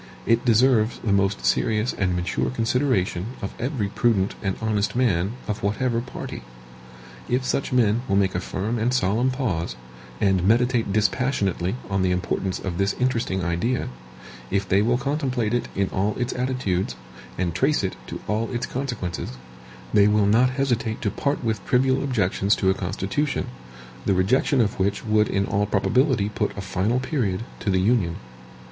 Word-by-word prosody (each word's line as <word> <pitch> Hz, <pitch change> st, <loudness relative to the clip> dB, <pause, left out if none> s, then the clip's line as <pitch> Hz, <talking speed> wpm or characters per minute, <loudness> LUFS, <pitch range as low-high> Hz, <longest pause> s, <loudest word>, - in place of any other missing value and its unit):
It 115 Hz, +1 st, +3 dB
deserves 120 Hz, -1 st, +3 dB
the 105 Hz, -, +1 dB
most 100 Hz, 0 st, +1 dB
serious 110 Hz, +2 st, +1 dB
and 90 Hz, -3 st, 0 dB
mature 90 Hz, +1 st, -1 dB
consideration 115 Hz, -6 st, 0 dB
of 100 Hz, -, -5 dB
every 125 Hz, -5 st, -1 dB
prudent 105 Hz, -3 st, +1 dB
and 95 Hz, -2 st, -1 dB
honest 110 Hz, -1 st, 0 dB
man 105 Hz, -5 st, +1 dB
of 105 Hz, 0 st, -3 dB
whatever 115 Hz, +3 st, 0 dB
party. 120 Hz, -, -7 dB, 0.9 s
If 125 Hz, +1 st, +1 dB
such 135 Hz, -, -1 dB
men 115 Hz, -2 st, +3 dB
will 100 Hz, -, +1 dB
make 95 Hz, -1 st, +2 dB
a 90 Hz, -, 0 dB
firm 105 Hz, +5 st, -3 dB
and 115 Hz, +3 st, +1 dB
solemn 115 Hz, +3 st, +2 dB
pause, 100 Hz, -, -2 dB, 0.4 s
and 95 Hz, -2 st, +3 dB
meditate 115 Hz, +1 st, +2 dB
dispassionately 105 Hz, -3 st, 0 dB
on 95 Hz, -1 st, 0 dB
the 95 Hz, -, +2 dB
importance 90 Hz, +1 st, -1 dB
of 90 Hz, -2 st, -4 dB
this 100 Hz, 0 st, +2 dB
interesting 115 Hz, -7 st, 0 dB
idea; 90 Hz, -, -1 dB, 0.6 s
if 100 Hz, 0 st, 0 dB
they 95 Hz, +2 st, +3 dB
will 120 Hz, +3 st, +2 dB
contemplate 130 Hz, -4 st, -1 dB
it 120 Hz, -, 0 dB
in 100 Hz, -1 st, +1 dB
all 100 Hz, +3 st, 0 dB
its 125 Hz, 0 st, -1 dB
attitudes, 125 Hz, -, -1 dB, 0.4 s
and 85 Hz, -2 st, -1 dB
trace 135 Hz, -, +2 dB
it 95 Hz, -, -2 dB
to -, -, -6 dB
all 110 Hz, +2 st, 0 dB
its 120 Hz, -1 st, -2 dB
consequences, 120 Hz, -, -4 dB, 0.6 s
they 100 Hz, 0 st, +6 dB
will 105 Hz, -1 st, +3 dB
not 115 Hz, +5 st, +4 dB
hesitate 125 Hz, -4 st, -1 dB
to 105 Hz, -, +1 dB
part 140 Hz, +5 st, -1 dB
with 110 Hz, -3 st, -1 dB
trivial 130 Hz, +1 st, +2 dB
objections 100 Hz, -6 st, +1 dB
to 95 Hz, -1 st, +2 dB
a -, -, +2 dB
Constitution, 95 Hz, +10 st, -2 dB, 0.6 s
the 95 Hz, -, +3 dB
rejection 125 Hz, +8 st, +3 dB
of 105 Hz, -3 st, -1 dB
which 100 Hz, +3 st, 0 dB
would 105 Hz, -1 st, +3 dB
in 100 Hz, 0 st, 0 dB
all 100 Hz, +1 st, 0 dB
probability 105 Hz, +3 st, +2 dB
put 105 Hz, -, -2 dB
a -, -, -3 dB
final 100 Hz, +5 st, 0 dB
period 115 Hz, -8 st, -1 dB, 0.2 s
to -, -, -2 dB
the 95 Hz, -1 st, +3 dB
Union. 95 Hz, -4 st, +2 dB
105 Hz, 165 wpm, -24 LUFS, 95-125 Hz, 0.9 s, they